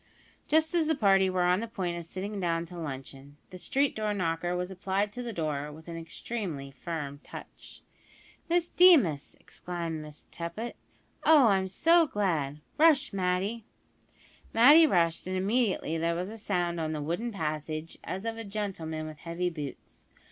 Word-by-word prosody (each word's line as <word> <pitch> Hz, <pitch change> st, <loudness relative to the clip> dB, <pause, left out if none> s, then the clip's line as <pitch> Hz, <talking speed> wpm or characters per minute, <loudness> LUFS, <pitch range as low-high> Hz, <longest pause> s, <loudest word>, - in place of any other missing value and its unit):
Just 315 Hz, +1 st, +3 dB
as 330 Hz, -3 st, +2 dB
the 320 Hz, -, +2 dB
party 195 Hz, -6 st, +4 dB
were 185 Hz, -1 st, +1 dB
on 180 Hz, +1 st, +3 dB
the 230 Hz, -, -4 dB
point 185 Hz, -6 st, -3 dB
of 170 Hz, -1 st, -6 dB
sitting 200 Hz, +4 st, -5 dB
down 170 Hz, -2 st, 0 dB
to 175 Hz, +1 st, -11 dB
luncheon, 140 Hz, -1 st, -7 dB
the 185 Hz, -, -9 dB
street 275 Hz, +8 st, +1 dB
door 215 Hz, -1 st, -1 dB
knocker 175 Hz, -1 st, -1 dB
was 180 Hz, +1 st, -3 dB
applied 195 Hz, +2 st, -1 dB
to 245 Hz, -, -5 dB
the 240 Hz, -1 st, -4 dB
door 150 Hz, -5 st, -3 dB
with 160 Hz, +2 st, -13 dB
an 170 Hz, -, -6 dB
extremely 165 Hz, -3 st, -5 dB
firm 145 Hz, -1 st, -5 dB
touch. -, -, -11 dB, 0.7 s
"Miss 345 Hz, 0 st, +2 dB
Deemas!" 280 Hz, -, +5 dB
exclaimed 170 Hz, -3 st, -5 dB
Miss 150 Hz, -1 st, -9 dB
Tippet. 170 Hz, +8 st, -5 dB, 0.5 s
"Oh! 295 Hz, -7 st, +7 dB
I'm 190 Hz, -1 st, +2 dB
so 330 Hz, -, +4 dB
glad. 160 Hz, -, -1 dB, 0.2 s
Rush, 300 Hz, -5 st, +5 dB
Matty." 190 Hz, +4 st, -1 dB, 0.9 s
Matty 290 Hz, +8 st, +8 dB
rushed, 170 Hz, -, +1 dB
and 185 Hz, 0 st, -1 dB
immediately 195 Hz, -5 st, 0 dB
there 170 Hz, +1 st, 0 dB
was 180 Hz, +4 st, -3 dB
a -, -, -7 dB
sound 175 Hz, -5 st, -1 dB
on 160 Hz, -1 st, -2 dB
the 150 Hz, -, -3 dB
wooden 175 Hz, +10 st, -2 dB
passage 155 Hz, -3 st, -4 dB
as 190 Hz, +4 st, -5 dB
of 225 Hz, 0 st, -3 dB
a -, -, -4 dB
gentleman 190 Hz, -7 st, -4 dB
with 155 Hz, -1 st, -9 dB
heavy 175 Hz, +2 st, -2 dB
boots. 150 Hz, -4 st, -9 dB
180 Hz, 170 wpm, -29 LUFS, 165-220 Hz, 0.9 s, Matty